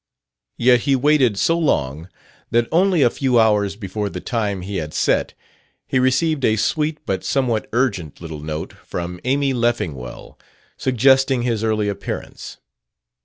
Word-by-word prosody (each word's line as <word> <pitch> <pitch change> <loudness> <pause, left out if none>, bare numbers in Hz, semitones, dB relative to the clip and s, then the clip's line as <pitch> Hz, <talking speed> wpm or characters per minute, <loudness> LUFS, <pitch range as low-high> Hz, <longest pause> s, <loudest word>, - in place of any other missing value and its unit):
Yet 125 0 +4
he 135 +3 +1
waited 135 -5 +3
so 165 +10 +2
long 75 - -1 0.4
that, 115 0 +2
only 175 -1 +3
a 120 - +5
few 130 -3 +1
hours 105 -3 +2
before 100 0 -4
the 90 - -6
time 105 -3 -2
he 100 +1 -4
had 75 -2 -5
set, - - +1 0.5
he 130 - 0
received 135 +3 +1
a 110 - +3
sweet 150 +7 0
but 95 -5 -2
somewhat 125 -5 0
urgent 105 - -1
little 80 -3 -7
note 75 +1 -5
from 90 0 -6
Amy 135 +1 +1
Leffingwell 90 - -3 0.4
suggesting 130 0 +3
his 115 -3 -1
early 110 -2 0
appearance. 100 -1 -6
115 Hz, 145 wpm, -20 LUFS, 95-130 Hz, 0.5 s, a